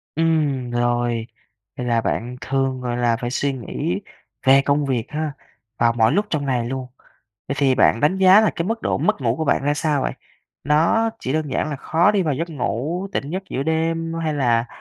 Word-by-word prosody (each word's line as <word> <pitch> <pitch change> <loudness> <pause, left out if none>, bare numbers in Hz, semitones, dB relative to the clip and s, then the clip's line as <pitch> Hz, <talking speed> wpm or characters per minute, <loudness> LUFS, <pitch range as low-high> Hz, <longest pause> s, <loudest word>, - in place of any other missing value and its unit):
Ừm, 150 -6 +1
rồi, 120 -1 0 0.5
vậy 125 - -3
là 115 -1 +2
bạn 120 +3 -2
thường, 135 -1 -1
gọi 120 -1 -2
là, 120 -1 +2
phải 120 -1 -4
suy 140 +2 -1
nghĩ 150 - -3 0.4
về 135 +1 +7
công 140 +1 +1
việc 125 -4 -1
ha, 155 -1 -2 0.5
vào 115 0 +3
mọi 115 -1 +3
lúc 205 +1 +1
trong 145 -3 -1
ngày 125 -3 0
luôn. 130 0 -4 0.6
Vậy 140 - -1
thì 135 -2 +3
bạn 115 - +3
đánh 180 +8 +2
giá 190 +2 +7
là 220 - +3
cái 170 - -1
mức 225 +1 -2
độ - - 0
mất 210 -8 0
ngủ 120 -1 0
của 160 - -2
bạn 140 - +1
ra 145 +1 +1
sao 145 -2 0
vậy? - - -1 0.5
Nó 165 +10 +3
chỉ 130 - -3
đơn 155 -2 -1
giản 155 - -1
là 145 - -3
khó 165 +7 +2
đi 205 -2 +1
vào 155 -5 0
giấc 165 +5 -3
ngủ, 155 - -2
tỉnh 140 - -3
giấc 190 +2 -3
giữa 135 - -2
đêm, 165 +1 -1
hay 155 -2 -1
là 120 -4 +2
140 Hz, 215 wpm, -21 LUFS, 125-160 Hz, 0.6 s, về